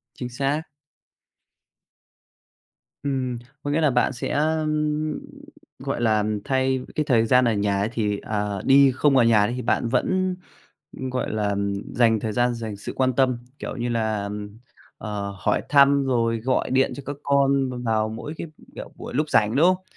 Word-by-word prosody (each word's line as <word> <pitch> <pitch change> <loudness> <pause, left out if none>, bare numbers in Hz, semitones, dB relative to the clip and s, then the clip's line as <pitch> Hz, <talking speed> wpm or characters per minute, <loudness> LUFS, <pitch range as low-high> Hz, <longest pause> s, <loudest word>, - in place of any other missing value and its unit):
Chính 125 -1 -5
xác. 140 +4 -1 2.4
Ừm, 130 -3 -2 0.3
có 145 - -2
nghĩa 160 +2 +1
là 150 - +4
bạn 130 - +2
sẽ, 120 - -4
ưm, 155 0 0 0.6
gọi - - -3
là, 110 -2 +2 0.2
thay 130 -1 +1 0.2
cái 155 - +1
thời 120 -6 +3
gian 125 +2 +4
ở 115 - +2
nhà 100 -1 0
ấy, 105 - 0
thì, 105 -3 -1
ờ, 105 -2 -3
đi 135 0 +6
không 140 -1 +3
ở 120 - +6
nhà 110 -3 +4
đi, 120 - -3
thì 125 - -4
bạn 120 0 0
vẫn, 185 +9 +1 0.6
ưm, 130 0 -4
gọi 125 -3 -2
là, 105 -1 -1
ừm, 100 0 -1 0.2
dành 115 -2 +4
thời 110 0 -3
gian, 120 +2 +2
dành 115 -3 -5
sự 100 - -7
quan 130 -1 +1
tâm, 130 -1 +2 0.2
kiểu - - -5
như 120 0 -2
là, 110 -3 -1
ừm, 105 +1 -6 0.4
ờ, 100 -2 -4
hỏi - - +1
thăm 140 -1 +5
rồi 115 -3 +1
gọi 130 +3 0
điện 135 +1 +2
cho 140 - -8
các 145 - -4
con 140 -1 +2
b 125 - -5
vào 110 -1 +1
mỗi 115 +7 -6
cái, - - -5 0.3
kiểu, - - -8
buổi - - -8
lúc 150 +3 0
rảnh, 110 -2 +3
đúng 155 +5 +5
không? 185 0 +2
125 Hz, 185 wpm, -24 LUFS, 110-140 Hz, 2.4 s, đi